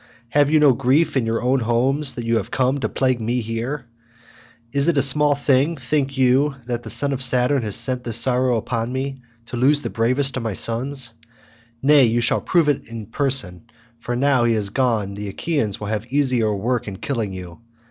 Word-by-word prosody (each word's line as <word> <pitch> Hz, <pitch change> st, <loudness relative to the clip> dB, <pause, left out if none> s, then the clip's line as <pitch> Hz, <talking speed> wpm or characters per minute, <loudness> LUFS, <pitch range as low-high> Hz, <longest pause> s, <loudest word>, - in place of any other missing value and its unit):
Have 145 Hz, +2 st, +2 dB
you 155 Hz, 0 st, +4 dB
no 145 Hz, -3 st, +5 dB
grief 135 Hz, +8 st, +1 dB
in 125 Hz, -4 st, 0 dB
your 115 Hz, +1 st, -1 dB
own 130 Hz, +2 st, +2 dB
homes 130 Hz, +5 st, +1 dB
that 120 Hz, -, -5 dB
you 115 Hz, 0 st, +1 dB
are -, -, -3 dB
come 130 Hz, +5 st, -1 dB
to -, -, -2 dB
plague 130 Hz, -3 st, 0 dB
me 120 Hz, +3 st, -1 dB
here? 120 Hz, +5 st, -4 dB, 0.9 s
Is 140 Hz, +3 st, +1 dB
it 170 Hz, -3 st, +2 dB
a -, -, +4 dB
small 145 Hz, +1 st, +3 dB
thing, 145 Hz, +3 st, +1 dB
think 135 Hz, +1 st, -2 dB
you, 135 Hz, +3 st, +2 dB
that 120 Hz, -1 st, -3 dB
the -, -, -9 dB
son 140 Hz, -1 st, 0 dB
of 135 Hz, -, -4 dB
Saturn 125 Hz, +1 st, +3 dB
has 105 Hz, -3 st, -1 dB
sent 125 Hz, -2 st, 0 dB
this 115 Hz, -2 st, -2 dB
sorrow 125 Hz, 0 st, +2 dB
upon 115 Hz, +1 st, -3 dB
me, 135 Hz, 0 st, -4 dB, 0.2 s
to 120 Hz, -, -7 dB
lose 145 Hz, +4 st, +3 dB
the -, -, -4 dB
bravest 130 Hz, +4 st, 0 dB
of -, -, -3 dB
my 110 Hz, -2 st, -3 dB
sons? 120 Hz, +3 st, 0 dB, 0.7 s
Nay, 145 Hz, -1 st, +6 dB
you 115 Hz, +1 st, +1 dB
shall 115 Hz, -, +1 dB
prove 170 Hz, -4 st, +1 dB
it 145 Hz, -2 st, -1 dB
in 115 Hz, -2 st, -8 dB
person, 115 Hz, -6 st, +1 dB, 0.3 s
for 120 Hz, +1 st, -4 dB
now 130 Hz, -1 st, +2 dB
he 115 Hz, -1 st, +2 dB
is 100 Hz, -2 st, -1 dB
gone 115 Hz, -6 st, 0 dB
the 105 Hz, +1 st, -6 dB
Achaeans 110 Hz, -, -2 dB
will 105 Hz, -, -6 dB
have 110 Hz, +3 st, -5 dB
easier 130 Hz, -6 st, +1 dB
work 120 Hz, +4 st, -2 dB
in 100 Hz, -2 st, -6 dB
killing 115 Hz, -6 st, -3 dB
you. 90 Hz, -2 st, -9 dB
125 Hz, 210 wpm, -21 LUFS, 115-140 Hz, 0.9 s, Nay